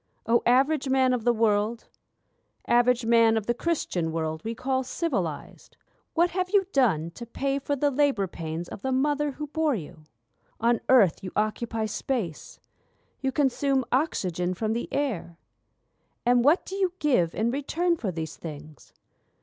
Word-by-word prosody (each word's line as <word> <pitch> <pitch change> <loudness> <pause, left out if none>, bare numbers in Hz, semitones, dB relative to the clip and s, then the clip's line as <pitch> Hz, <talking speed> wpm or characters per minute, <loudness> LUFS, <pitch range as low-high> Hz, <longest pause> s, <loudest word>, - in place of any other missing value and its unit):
O 235 +1 +3
Average 270 +3 +3
Man 260 -1 +3
of 240 -2 -2
the 240 - +5
world— 220 0 0 0.8
Average 245 0 +3
Man 230 -1 +4
of 215 - -2
the 240 - +1
Christian 230 - -1
world 160 -1 -3
we 225 +1 -4
call 260 +2 -1
civilised? 245 - -4 0.4
What 345 +1 +3
have 365 0 -1
you 390 0 +3
done 180 - +2
to 235 +7 -9
pay 275 +3 -1
for 285 +1 -2
the 285 +1 +1
labour 275 -7 +2
pains 165 -1 -6
of - - -9
the 265 - -2
mother 290 +2 +1
who 300 +3 -5
bore 305 -1 0
you? 155 -4 -9 0.5
On 235 +1 +2
earth 210 -12 +5
you 185 - -5
occupy 220 +1 -1
space; 210 - -4 0.6
you 270 -1 0
consume 270 -1 +1
oxygen 185 - 0
from 220 +3 -1
the 235 - -4
air: 220 -12 -2 0.9
And 245 0 +4
what 300 +7 +4
do 385 - -6
you 375 -3 +1
give 245 - +1
in 225 +2 +1
return 330 +6 0
for 225 -11 -3
these 160 -2 -6
things? 150 -2 -10
240 Hz, 160 wpm, -26 LUFS, 195-280 Hz, 0.9 s, the